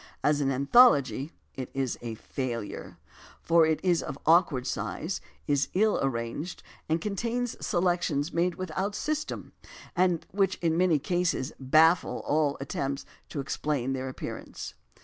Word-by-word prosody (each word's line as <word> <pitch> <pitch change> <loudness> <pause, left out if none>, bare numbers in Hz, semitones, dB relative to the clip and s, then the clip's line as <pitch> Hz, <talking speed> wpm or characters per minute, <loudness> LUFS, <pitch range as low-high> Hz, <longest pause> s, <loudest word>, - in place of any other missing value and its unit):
As 150 0 +3
an 135 -1 +1
anthology 140 - +5 0.2
it 130 -2 -6
is 135 -3 -1
a 115 -2 -5
failure, 115 -2 -5 0.4
for 165 -1 +4
it 160 -1 +1
is 175 -2 +3
of 140 - -5
awkward 160 -6 +4
size, - - -3 0.2
is 145 0 +2
ill 215 +3 +3
arranged, 135 +6 -3 0.3
and 160 +1 +2
contains 230 +6 -2
selections 175 -4 0
made 170 +1 +1
with 185 -2 -5
out 200 +2 -1
system, 305 +6 -3 0.4
and 175 -2 +2
which 195 -1 +2
in 165 -2 0
many 175 -2 +4
cases 170 -3 -1
baffle 155 +6 +4
all 145 -1 +1
attempts 140 0 -3 0.2
to 145 - -4
explain 135 -1 -1
their 130 0 -3
appearance. 130 - -7
155 Hz, 140 wpm, -28 LUFS, 135-180 Hz, 0.4 s, anthology